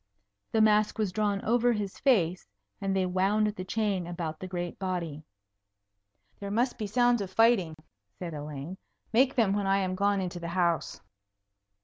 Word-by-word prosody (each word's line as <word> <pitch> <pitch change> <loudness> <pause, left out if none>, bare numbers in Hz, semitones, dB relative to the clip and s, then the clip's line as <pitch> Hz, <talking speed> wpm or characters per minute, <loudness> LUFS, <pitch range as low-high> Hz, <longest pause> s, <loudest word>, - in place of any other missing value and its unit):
The 220 - +3
mask 215 -1 +3
was 215 -4 0
drawn 205 0 -1
over 240 +2 +3
his 205 -3 -4
face, 185 - +2 0.3
and 195 -1 -1
they 190 -1 +2
wound 190 +4 +2
the 205 -3 -6
chain 195 -2 -1
about 170 -3 -5
the 185 - -6
great 175 -1 -5
body. 175 -6 -3 1.2
"There 200 - -5
must 240 +5 0
be 215 - -2
sounds 240 +1 +3
of 195 - -4
fighting," 195 -6 +3 0.4
said 170 -2 -6
Elaine. 150 +4 -7 0.3
"Make 260 +3 +4
them 220 -6 +3
when 200 -1 -1
I 195 0 +3
am 185 -2 -1
gone 200 +1 +1
into 180 -1 -4
the 170 - -5
house." 170 -1 0
195 Hz, 165 wpm, -29 LUFS, 175-215 Hz, 1.2 s, Make